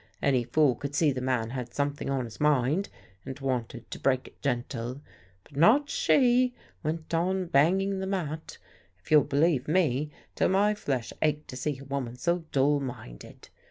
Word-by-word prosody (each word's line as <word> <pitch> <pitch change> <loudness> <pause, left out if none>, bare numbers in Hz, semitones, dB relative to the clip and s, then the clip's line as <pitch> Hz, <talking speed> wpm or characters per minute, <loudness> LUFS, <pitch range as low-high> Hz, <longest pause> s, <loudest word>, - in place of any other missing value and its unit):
Any 130 -3 +2
fool 140 +2 +3
could 140 +4 -6
see 150 -1 +3
the 130 -1 -4
man 125 -3 -1
had 125 -2 -6
something 145 0 -2
on 135 -2 -1
his 115 - -11
mind 150 +5 +2 0.3
and 135 +2 -7
wanted 125 -3 -3
to - - -6
break 130 -1 +1
it - - -31
gentle. 120 +1 -3 0.4
But 140 - -19
not 245 - +4
she! 255 - +3 0.3
Went 160 +1 -4
on 185 +3 +1
banging 190 +6 +2
the 190 - -3
mat, 160 -5 -4 0.4
if 90 - -19
you'll 150 -2 +7
believe 145 -1 +1
me, 150 -4 +1 0.2
till - - +1
my 200 +3 +3
flesh 135 - -3
ached 150 0 0
to - - -7
see 140 +2 -2
a 135 - -11
woman 135 -3 -4
so 170 +5 -1
dull 145 +2 +3
minded. 120 - -9
145 Hz, 175 wpm, -28 LUFS, 130-170 Hz, 0.4 s, you'll